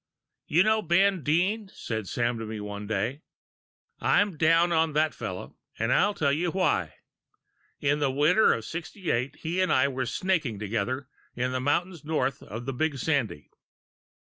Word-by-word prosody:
"You 170 Hz, +5 st, +4 dB
know 220 Hz, +1 st, +3 dB
Ben 190 Hz, +1 st, +3 dB
Dean," 190 Hz, -, +1 dB
said 110 Hz, -3 st, -5 dB
Sam 120 Hz, +1 st, -1 dB
to 115 Hz, -, -4 dB
me 110 Hz, 0 st, -5 dB
one 105 Hz, 0 st, -6 dB
day; 110 Hz, +7 st, -2 dB, 0.8 s
"I'm 205 Hz, -3 st, +2 dB
down 165 Hz, +3 st, +4 dB
on 160 Hz, -2 st, +2 dB
that 155 Hz, +1 st, +2 dB
fellow, 90 Hz, -1 st, -7 dB, 0.2 s
and 115 Hz, +3 st, +1 dB
I'll 205 Hz, 0 st, +3 dB
tell 140 Hz, -2 st, +1 dB
you 170 Hz, +4 st, 0 dB
why. 165 Hz, -, 0 dB, 0.8 s
In 145 Hz, +1 st, +1 dB
the 145 Hz, -2 st, +2 dB
winter 150 Hz, +10 st, +4 dB
of 115 Hz, -, -2 dB
'68 160 Hz, -, -3 dB
he 170 Hz, +3 st, -2 dB
and 185 Hz, -, +2 dB
I 130 Hz, -, +4 dB
were 130 Hz, -2 st, -2 dB
snaking 155 Hz, -, 0 dB
together 115 Hz, +6 st, -2 dB, 0.3 s
in 125 Hz, +1 st, -1 dB
the 130 Hz, 0 st, -1 dB
mountains 170 Hz, +4 st, -1 dB
north 140 Hz, -4 st, -1 dB
of 115 Hz, +4 st, -7 dB
the 135 Hz, -, -3 dB
Big 150 Hz, +2 st, -1 dB
Sandy." 125 Hz, -, -1 dB
145 Hz, 165 wpm, -27 LUFS, 120-170 Hz, 0.8 s, You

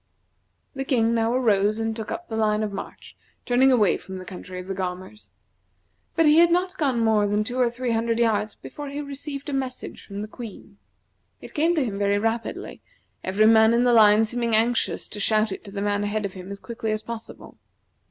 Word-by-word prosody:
The 270 Hz, -1 st, -3 dB
King 235 Hz, -4 st, +2 dB
now 225 Hz, 0 st, +1 dB
arose 215 Hz, -4 st, +2 dB
and 225 Hz, 0 st, -2 dB
took 220 Hz, -1 st, -6 dB
up 345 Hz, +1 st, -5 dB
the 220 Hz, -, -5 dB
line 215 Hz, -1 st, +1 dB
of 210 Hz, -2 st, -3 dB
march, 195 Hz, -, -8 dB, 0.3 s
turning 260 Hz, +2 st, +4 dB
away 215 Hz, -7 st, +3 dB
from 190 Hz, 0 st, -9 dB
the 185 Hz, -, -8 dB
country 185 Hz, 0 st, -8 dB
of 180 Hz, -, -8 dB
the 195 Hz, -, -4 dB
Gaumers. 185 Hz, +2 st, -6 dB, 0.9 s
But 330 Hz, -, +4 dB
he 300 Hz, +2 st, +6 dB
had 340 Hz, 0 st, +6 dB
not 360 Hz, +2 st, +1 dB
gone 265 Hz, -6 st, +1 dB
more 215 Hz, -2 st, +3 dB
than 205 Hz, +1 st, +1 dB
two 245 Hz, +4 st, -4 dB
or 245 Hz, -2 st, +4 dB
three 240 Hz, +1 st, -3 dB
hundred 230 Hz, 0 st, 0 dB
yards 215 Hz, -2 st, +1 dB
before 290 Hz, -1 st, -8 dB
he 285 Hz, +1 st, -5 dB
received 280 Hz, 0 st, -6 dB
a 290 Hz, -, -4 dB
message 260 Hz, -2 st, -4 dB
from 200 Hz, 0 st, -6 dB
the -, -, -6 dB
Queen. 225 Hz, -1 st, -11 dB, 0.6 s
It -, -, -12 dB
came 330 Hz, +3 st, +2 dB
to 300 Hz, -5 st, +1 dB
him 200 Hz, -4 st, -4 dB
very 200 Hz, 0 st, +2 dB
rapidly, 225 Hz, +2 st, -3 dB, 0.4 s
every 195 Hz, +3 st, +2 dB
man 220 Hz, +1 st, +6 dB
in 240 Hz, -, +3 dB
the 245 Hz, -1 st, +4 dB
line 215 Hz, -1 st, +6 dB
seeming 235 Hz, 0 st, 0 dB
anxious 230 Hz, +2 st, 0 dB
to 210 Hz, -, -7 dB
shout 215 Hz, +1 st, +2 dB
it 190 Hz, -, -6 dB
to 200 Hz, -, -9 dB
the 200 Hz, 0 st, -3 dB
man 205 Hz, 0 st, 0 dB
ahead 210 Hz, 0 st, -1 dB
of 195 Hz, -, -5 dB
him 185 Hz, +1 st, -9 dB
as 200 Hz, -, -5 dB
quickly 225 Hz, +1 st, -5 dB
as 215 Hz, 0 st, -2 dB
possible. 230 Hz, -1 st, -9 dB
225 Hz, 215 wpm, -24 LUFS, 205-250 Hz, 0.9 s, he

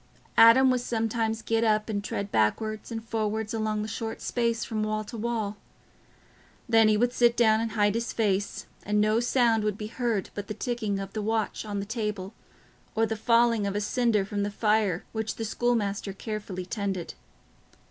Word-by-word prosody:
Adam 255 Hz, +3 st, +8 dB
would 250 Hz, -1 st, +1 dB
sometimes 225 Hz, -1 st, -1 dB
get 225 Hz, 0 st, +1 dB
up 215 Hz, -1 st, +2 dB
and 205 Hz, -2 st, -2 dB
tread 200 Hz, 0 st, -4 dB
backwards 215 Hz, -, 0 dB
and 225 Hz, 0 st, -5 dB
forwards 220 Hz, 0 st, -2 dB
along 215 Hz, -1 st, -1 dB
the -, -, -4 dB
short 225 Hz, 0 st, -4 dB
space 230 Hz, -1 st, -1 dB
from 215 Hz, -1 st, -3 dB
wall 215 Hz, 0 st, -1 dB
to 215 Hz, -, -9 dB
wall; 220 Hz, -2 st, -2 dB, 1.1 s
then 225 Hz, -2 st, +5 dB
he 215 Hz, -1 st, +4 dB
would 245 Hz, +2 st, +1 dB
sit 240 Hz, -1 st, +3 dB
down 220 Hz, -2 st, +4 dB
and 225 Hz, -1 st, -3 dB
hide 205 Hz, -2 st, +2 dB
his 230 Hz, +1 st, -2 dB
face, 205 Hz, -3 st, -1 dB, 0.2 s
and 210 Hz, 0 st, +1 dB
no 215 Hz, +2 st, +3 dB
sound 240 Hz, -2 st, +2 dB
would 210 Hz, -1 st, -1 dB
be 215 Hz, -, -5 dB
heard 230 Hz, -3 st, -2 dB
but 205 Hz, -1 st, -6 dB
the 215 Hz, -, -5 dB
ticking 230 Hz, -5 st, -2 dB
of 195 Hz, 0 st, -6 dB
the 215 Hz, -, -2 dB
watch 220 Hz, +1 st, -1 dB
on 205 Hz, -1 st, -3 dB
the 200 Hz, -, -3 dB
table, 210 Hz, -3 st, -3 dB, 0.6 s
or 225 Hz, +1 st, +3 dB
the 220 Hz, 0 st, -2 dB
falling 230 Hz, -1 st, +3 dB
of 200 Hz, -, -3 dB
a -, -, +1 dB
cinder 215 Hz, -1 st, +1 dB
from 205 Hz, 0 st, -3 dB
the 205 Hz, -, 0 dB
fire 210 Hz, -4 st, +1 dB
which 220 Hz, -1 st, -3 dB
the 225 Hz, -, -4 dB
schoolmaster 210 Hz, -4 st, -1 dB
carefully 200 Hz, -3 st, -5 dB
tended. 190 Hz, -3 st, -3 dB
220 Hz, 190 wpm, -27 LUFS, 205-230 Hz, 1.1 s, Adam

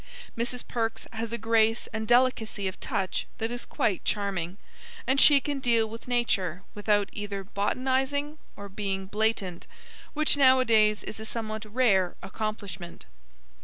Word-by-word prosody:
Mrs. 240 Hz, +1 st, -3 dB
Perks 225 Hz, -2 st, -2 dB
has 225 Hz, 0 st, -4 dB
a 235 Hz, -, -1 dB
grace 225 Hz, 0 st, +2 dB
and 220 Hz, -1 st, -3 dB
delicacy 240 Hz, -5 st, +2 dB
of 185 Hz, -, -6 dB
touch 195 Hz, -3 st, -2 dB
that 225 Hz, -1 st, -2 dB
is 245 Hz, 0 st, -4 dB
quite 190 Hz, -, 0 dB
charming, 195 Hz, -3 st, -1 dB, 0.5 s
and 270 Hz, +1 st, +3 dB
she 290 Hz, -2 st, +8 dB
can 285 Hz, 0 st, -3 dB
deal 235 Hz, -3 st, +3 dB
with 225 Hz, +3 st, -10 dB
nature 195 Hz, -8 st, 0 dB
without 205 Hz, -1 st, +1 dB
either 205 Hz, -1 st, -4 dB
botanising 265 Hz, +9 st, -1 dB, 0.2 s
or 200 Hz, -, -8 dB
being 195 Hz, -1 st, -3 dB
blatant, 205 Hz, -3 st, -1 dB, 0.5 s
which 305 Hz, 0 st, +3 dB
nowadays 230 Hz, -6 st, +5 dB
is 220 Hz, -, -7 dB
a -, -, -6 dB
somewhat 220 Hz, -1 st, -4 dB
rare 200 Hz, -7 st, +3 dB
accomplishment. 195 Hz, -3 st, -5 dB
220 Hz, 140 wpm, -27 LUFS, 200-245 Hz, 0.5 s, she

